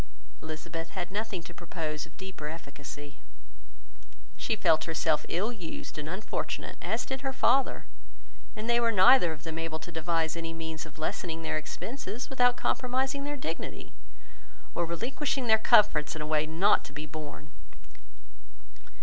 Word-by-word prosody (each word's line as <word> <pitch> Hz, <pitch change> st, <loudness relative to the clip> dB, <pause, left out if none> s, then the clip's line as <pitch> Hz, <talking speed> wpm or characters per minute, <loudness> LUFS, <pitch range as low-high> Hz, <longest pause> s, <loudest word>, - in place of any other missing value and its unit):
Elizabeth 160 Hz, +1 st, -5 dB
had 175 Hz, 0 st, -2 dB
nothing 205 Hz, -3 st, -2 dB
to 175 Hz, -, -10 dB
propose 160 Hz, -3 st, -4 dB
of 160 Hz, -, -21 dB
deeper 190 Hz, -5 st, -6 dB
efficacy. 145 Hz, -2 st, -8 dB, 1.2 s
She 225 Hz, -, 0 dB
felt 165 Hz, -6 st, +4 dB
herself 160 Hz, -1 st, +1 dB
ill 205 Hz, +7 st, +1 dB
used 180 Hz, -8 st, -6 dB
and 150 Hz, +1 st, -4 dB
unfortunate, 190 Hz, +5 st, -3 dB
as -, -, 0 dB
did 265 Hz, -1 st, -3 dB
her 270 Hz, -1 st, -1 dB
father; 265 Hz, +1 st, +3 dB, 0.7 s
and 215 Hz, +1 st, -4 dB
they 235 Hz, 0 st, +4 dB
were 235 Hz, -1 st, +4 dB
neither 190 Hz, -2 st, +7 dB
of 150 Hz, -2 st, -7 dB
them 160 Hz, 0 st, -4 dB
able 165 Hz, -1 st, -2 dB
to 175 Hz, -, -9 dB
devise 160 Hz, 0 st, 0 dB
any 165 Hz, -1 st, -3 dB
means 160 Hz, -1 st, -5 dB
of 150 Hz, -, -15 dB
lessening 165 Hz, +1 st, -2 dB
their -, -, -1 dB
expenses 230 Hz, -, -5 dB
without 245 Hz, -2 st, +4 dB
compromising 265 Hz, +2 st, 0 dB
their 290 Hz, 0 st, -2 dB
dignity, 165 Hz, -, -5 dB, 0.8 s
or 170 Hz, -1 st, 0 dB
relinquishing 260 Hz, -, -1 dB
their 220 Hz, -1 st, +6 dB
comforts 205 Hz, -9 st, +5 dB
in 155 Hz, -, -4 dB
a -, -, -3 dB
way 155 Hz, 0 st, +2 dB
not 175 Hz, +6 st, +4 dB
to 140 Hz, -, -10 dB
be 150 Hz, +1 st, -4 dB
borne. 150 Hz, -1 st, -8 dB
170 Hz, 155 wpm, -30 LUFS, 155-220 Hz, 1.2 s, neither